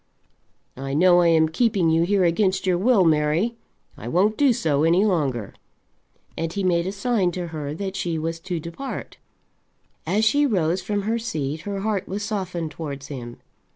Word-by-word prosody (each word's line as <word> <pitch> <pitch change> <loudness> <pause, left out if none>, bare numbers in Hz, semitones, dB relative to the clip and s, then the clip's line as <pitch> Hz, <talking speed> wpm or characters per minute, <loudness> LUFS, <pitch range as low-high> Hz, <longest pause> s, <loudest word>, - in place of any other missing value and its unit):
I 135 +1 -4
know 175 +2 +5
I 170 - +4
am 160 -1 +4
keeping 180 -1 +1
you 165 +1 +3
here 190 +2 +2
against 185 +2 +1
your 185 -1 +2
will, 210 -2 +4
Mary. 160 +8 +2 0.4
I 115 - -9
won't 195 - +2
do 280 0 +4
so 155 -11 +1
any 175 +5 +4
longer." 140 - -1 0.8
And 165 0 -3
he 200 +2 -3
made 175 -1 +1
a - - -1
sign 200 -3 0
to 175 -1 -4
her 150 -2 -5
that 195 +2 -4
she 175 -4 -2
was 165 +1 -3
to 175 0 -4
depart. 170 - -7 0.9
As 215 +3 +2
she 290 +6 +3
rose 180 - 0
from 205 -1 -2
her 225 +3 0
seat 155 -10 -3
her 200 -1 -3
heart 205 -2 -1
was 205 +2 -4
softened 185 -6 -3
towards 140 -3 -7
him. 120 -4 -8
175 Hz, 180 wpm, -23 LUFS, 160-205 Hz, 0.9 s, know